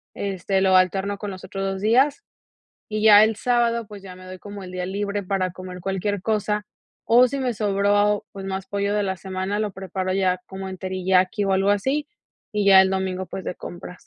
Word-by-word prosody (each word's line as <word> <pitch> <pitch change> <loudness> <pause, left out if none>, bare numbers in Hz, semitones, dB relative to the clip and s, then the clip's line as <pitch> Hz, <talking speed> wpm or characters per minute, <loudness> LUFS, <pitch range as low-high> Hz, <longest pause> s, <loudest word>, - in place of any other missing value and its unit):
este, 195 -1 -1
lo 190 -1 +4
alterno 190 +2 +2
con 205 +1 -5
los 185 0 -9
otros 195 +1 -4
2 195 0 -3
días. 265 - +3 0.7
Y 215 0 -3
ya 210 -1 +8
el 220 0 0
sábado, 235 -1 +1
pues, 205 -1 -11
ya 185 -2 -10
me 185 - -13
doy 185 0 -9
como 205 0 -9
el 180 - -9
día 180 0 -3
libre 200 +1 -2
para 185 -1 -1
comer 185 0 -9
cualquier 195 +2 -2
cosa, 210 -1 -1 0.4
o 245 +2 +5
si 280 - -4
me 250 -2 -1
sobró, 205 0 +1
pues, 195 -1 -8
más 190 0 -4
pollo 200 +1 -1
de 210 - +1
la 190 -1 -2
semana, 190 +2 -3
lo 210 -2 -2
preparo 190 0 -4
ya 185 -1 +1
como 190 0 -7
en 185 -1 -7
teriyaki 185 +1 +1
o 195 - +1
algo 195 +1 +2
así, 265 +9 0 0.4
y 210 -1 0
ya 195 -1 +9
el 190 0 +3
domingo, 190 -1 -2
pues, 190 - -7
de - - -4
compras. 180 +1 -10
195 Hz, 215 wpm, -23 LUFS, 190-210 Hz, 0.7 s, ya